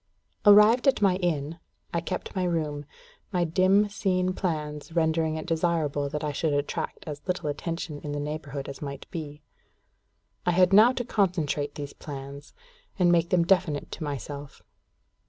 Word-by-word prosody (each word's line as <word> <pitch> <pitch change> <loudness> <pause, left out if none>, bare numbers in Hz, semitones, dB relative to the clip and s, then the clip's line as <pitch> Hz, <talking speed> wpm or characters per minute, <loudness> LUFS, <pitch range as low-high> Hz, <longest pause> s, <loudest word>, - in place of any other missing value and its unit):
Arrived 210 +6 +7
at 270 - +4
my 195 -3 +3
inn, 165 -3 -2 0.3
I 170 - 0
kept 170 - -5
my 185 - 0
room, 155 -4 -1 0.5
my 180 -3 +1
dim 185 +5 +3
seen 185 -2 0
plans 150 -5 -3
rendering 160 -1 +1
it 155 - -5
desirable 160 -4 0
that 150 +2 -4
I 150 - -1
should 150 +1 -1
attract 145 0 -2
as 145 -2 -6
little 180 -4 -2
attention 155 0 -4
in 150 - -6
the 145 - -3
neighbourhood 145 -2 -5
as 140 - -8
might 140 -1 -6
be. 150 -4 -7 1.0
I 175 - +1
had 180 +1 +4
now 220 +5 +8
to 245 -2 -3
concentrate 165 - 0
these 145 -1 -6
plans, 140 0 -9 0.4
and 180 -3 +4
make 170 -1 +3
them 175 -2 +3
definite 170 -5 +1
to 160 - -6
myself. 145 0 -6
160 Hz, 160 wpm, -27 LUFS, 145-180 Hz, 1.0 s, now